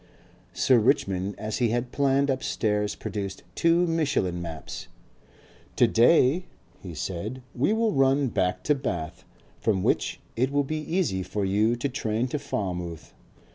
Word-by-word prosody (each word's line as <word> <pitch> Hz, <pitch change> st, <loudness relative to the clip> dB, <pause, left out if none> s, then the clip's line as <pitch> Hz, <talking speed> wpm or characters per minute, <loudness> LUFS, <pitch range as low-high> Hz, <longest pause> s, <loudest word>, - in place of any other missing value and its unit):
Sir 130 Hz, -3 st, +4 dB
Richmond 100 Hz, -6 st, +1 dB
as 110 Hz, +1 st, -3 dB
he 120 Hz, -2 st, +3 dB
had 120 Hz, +2 st, -1 dB
planned 140 Hz, 0 st, +2 dB
upstairs 105 Hz, -5 st, -1 dB
produced 100 Hz, -2 st, -5 dB
two 170 Hz, +1 st, +3 dB
Michelin 145 Hz, -, 0 dB
maps. 80 Hz, -5 st, -7 dB, 0.9 s
"To -, -, +5 dB
day," 140 Hz, +7 st, +4 dB, 0.3 s
he 90 Hz, -4 st, -8 dB
said, 100 Hz, -, -4 dB
"we 130 Hz, +11 st, +1 dB
will 220 Hz, 0 st, +2 dB
run 135 Hz, 0 st, +3 dB
back 95 Hz, -4 st, 0 dB
to 150 Hz, -, +3 dB
Bath 90 Hz, -, -4 dB, 0.4 s
from 95 Hz, -4 st, +1 dB
which -, -, 0 dB, 0.2 s
it 130 Hz, +3 st, +1 dB
will 145 Hz, 0 st, +2 dB
be 155 Hz, +3 st, -3 dB
easy 155 Hz, -, -1 dB
for 100 Hz, +2 st, -2 dB
you 105 Hz, +5 st, +2 dB
to 120 Hz, +4 st, -2 dB
train 115 Hz, -3 st, -1 dB
to 150 Hz, -, -2 dB
Falmouth. 90 Hz, -, -4 dB
120 Hz, 145 wpm, -26 LUFS, 95-140 Hz, 0.9 s, To